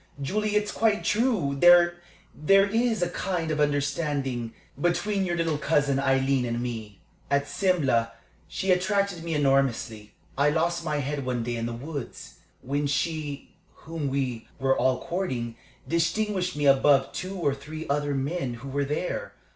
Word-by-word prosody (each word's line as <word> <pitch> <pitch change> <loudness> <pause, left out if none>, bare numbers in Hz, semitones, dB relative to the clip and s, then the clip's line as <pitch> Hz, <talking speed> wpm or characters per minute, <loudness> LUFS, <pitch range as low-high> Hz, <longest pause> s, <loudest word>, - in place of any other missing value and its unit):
Julie, 210 +9 -1
it's 210 0 +1
quite 220 -2 +1
true, 210 - +1
there 175 0 +7 0.5
is 195 +5 +3
a 175 - 0
kind 175 -4 -2
of 155 - -1
understanding 140 -4 -1 0.3
between 195 +3 +1
your 175 -1 -1
little 165 -3 0
cousin 145 -3 +2
Aileen 135 -1 +2
and 120 -1 -2
me. 115 -4 -5 0.3
At 140 0 +1
Simla 145 -9 +1 0.3
she 190 - -1
attracted 190 -1 +1
me 165 -1 -2
enormously. 135 -7 0 0.3
I 145 +1 +5
lost 170 +2 0
my 155 -2 -1
head 145 0 -2
one 125 -2 -2
day 120 0 -2
in 115 0 -2
the 120 - -4
woods, 140 +2 -7 0.2
when 145 +2 -1
she 145 0 -2 0.3
whom 160 -3 -3
we 130 -4 -2
were 135 0 +2
all 130 0 +1
courting 130 -11 -3 0.3
distinguished 185 +2 0
me 145 0 -1
above 135 0 +4
two 185 +2 -5
or 145 -6 +1
three 150 +3 -8
other 145 0 0
men 135 -2 -2
who 135 +4 -9
were 140 +1 -1
there. 150 +5 -3
145 Hz, 155 wpm, -26 LUFS, 135-175 Hz, 0.5 s, there